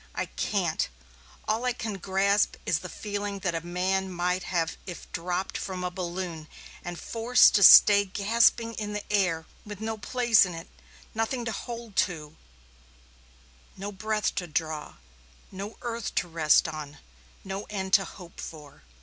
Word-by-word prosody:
I - - -1
can't. 180 -6 -1 0.6
All 220 +3 0
I 250 -1 +1
can 215 -4 -5
grasp 200 +2 +2
is - - +1
the - - -8
feeling 205 -1 -4
that 180 - +1
a 165 - -2
man 185 +2 -1
might 180 +1 0
have 170 -3 -1
if 180 - -7
dropped 180 +2 -3
from 185 -1 -4
a 180 - -2
balloon 175 -3 -5 0.4
and 175 0 -6
forced 235 +2 +4
to 205 - +4
stay 205 +1 +9
gasping 230 +3 +2
in 210 -2 -4
the 210 - -3
air, 175 -5 +1 0.2
with 210 -2 -8
no 220 0 -3
place 235 0 +4
in 180 -3 -3
it, 165 +3 -8 0.5
nothing 230 +2 -1
to 225 - -2
hold 230 -3 -7
to, 160 -4 0 1.4
no 200 +2 -5
breath 215 +1 -1
to 175 - -8
draw, 155 -1 -3 0.6
no 200 +3 -7
earth 235 -2 -4
to 180 - +1
rest 160 -2 +3
on, 150 -2 -7 0.5
no 195 +1 -5
end 190 -2 -4
to 195 - +6
hope 175 -3 -12
for. 150 -3 -9
190 Hz, 160 wpm, -27 LUFS, 175-215 Hz, 1.4 s, stay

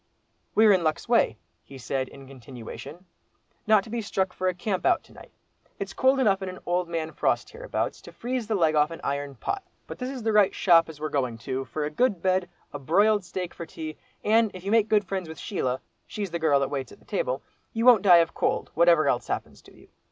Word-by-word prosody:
"We're 220 -1 +6
in 185 -3 +2
luck's 155 +6 -1
way," 230 - +3 0.3
he 135 - -12
said, 130 +2 -2
in 135 -1 -13
continuation, 130 +5 -10 0.6
"not 215 -2 +5
to - - -12
be 235 0 -2
struck 190 -3 -1
for 185 - -2
a 185 - +2
camp 185 +1 -2
out 360 -2 +3
to - - -20
night. - - -14 0.5
It's - - -5
cold 265 +1 +3
enough 200 -6 +3
in 190 - -3
an 185 - -8
old 175 0 0
man 160 -1 -3
frost - - 0
hereabouts, - - -3
to - - -12
freeze 245 -2 -3
the 220 - 0
leg 165 -5 +3
off 150 0 +3
an 165 - -8
iron 140 0 -3
pot. 390 - -3 0.2
But - - -9
this 250 0 -3
is 260 -4 -6
the 220 -1 +1
right 210 -2 +4
shop 165 -3 +5
as 155 -2 -10
we're 155 +1 -3
going 125 -5 -1
to, 130 0 -2
for 150 +5 -3
a 150 - -4
good 205 +3 +1
bed, 185 0 +1 0.2
a 145 - -5
broiled 205 +8 +3
steak 180 0 -5
for 170 - -8
tea, 155 -1 -7 0.3
and 225 +1 +4
if 185 - -9
you 200 - -2
make 220 -1 +3
friends 185 -2 -4
with 160 - -8
Sheila 130 -10 -2 0.3
(she's 200 -4 -5
the 170 - -2
girl 150 -3 +3
that 135 - -1
waits 135 -3 -4
at - - -17
table) - - -2 0.3
you 230 0 -1
won't 245 -5 +8
die 180 -4 +7
of - - -21
cold, - - -1
whatever 170 -3 +4
else 125 - 0
happens - - -4
to - - -18
you. - - -19
180 Hz, 235 wpm, -26 LUFS, 150-215 Hz, 0.6 s, won't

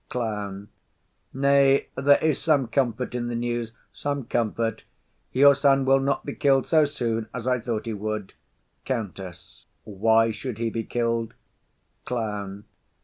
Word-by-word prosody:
CLOWN. 105 -4 -4 0.6
Nay, 140 0 +3
there 140 +2 +5
is 155 -3 +2
some 150 -5 +3
comfort 125 0 -1
in 120 -1 -2
the 120 - -3
news, 120 -1 -3 0.2
some 145 -1 -3
comfort; 115 0 -1 0.5
your 140 +2 +7
son 135 -1 +3
will 135 +1 +5
not 140 +1 -1
be 140 - -4
kill'd 135 -2 +2
so 155 -2 +4
soon 115 -6 -2
as 125 -2 -5
I 125 -1 +1
thought 115 -1 -3
he 115 - -3
would. 105 -1 -4 0.5
COUNTESS. 95 -7 -6 0.2
Why 110 +2 +2
should 110 +1 -6
he 115 0 -1
be 115 -1 -3
kill'd? 115 -1 -1 0.7
CLOWN. 105 -4 -4
120 Hz, 145 wpm, -25 LUFS, 110-135 Hz, 0.7 s, your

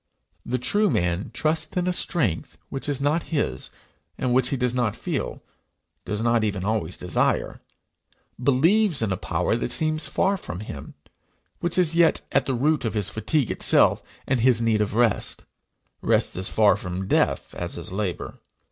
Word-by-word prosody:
The 125 +1 -1
true 205 - +2
man 90 - 0
trusts 155 +6 -1
in 180 0 +1
a 180 - +1
strength 130 - -1
which 135 +1 -4
is 140 -2 -1
not 150 +4 +2
his, 140 - -2 0.5
and 125 -2 0
which 130 0 +3
he 135 - -1
does 125 -1 0
not 120 -4 0
feel, - - -4 0.6
does 105 +2 -2
not 115 -1 +2
even 100 -3 -1
always 105 -5 -1
desire; 90 - 0 0.8
believes 160 - +3
in 105 - 0
a - - +1
power 90 +3 -1
that 120 - -2
seems 155 +4 +1
far 195 +1 +1
from 90 - -7
him, 75 -8 -8 0.6
which 175 +1 -2
is 175 -3 +3
yet 170 -1 +4
at - - +2
the 135 - 0
root 150 +5 +1
of 115 -2 -2
his 100 -2 -1
fatigue 130 +4 0
itself - - +3 0.2
and 130 -1 +1
his 120 0 +4
need 115 -2 +2
of 105 0 -1
rest 115 -3 +1 0.6
rest - - +2
as 95 +1 -1
far 105 -3 +4
from 95 -1 -5
death - - +1
as - - -5
is - - -5
labour. 95 -2 -3
120 Hz, 175 wpm, -24 LUFS, 100-155 Hz, 0.8 s, yet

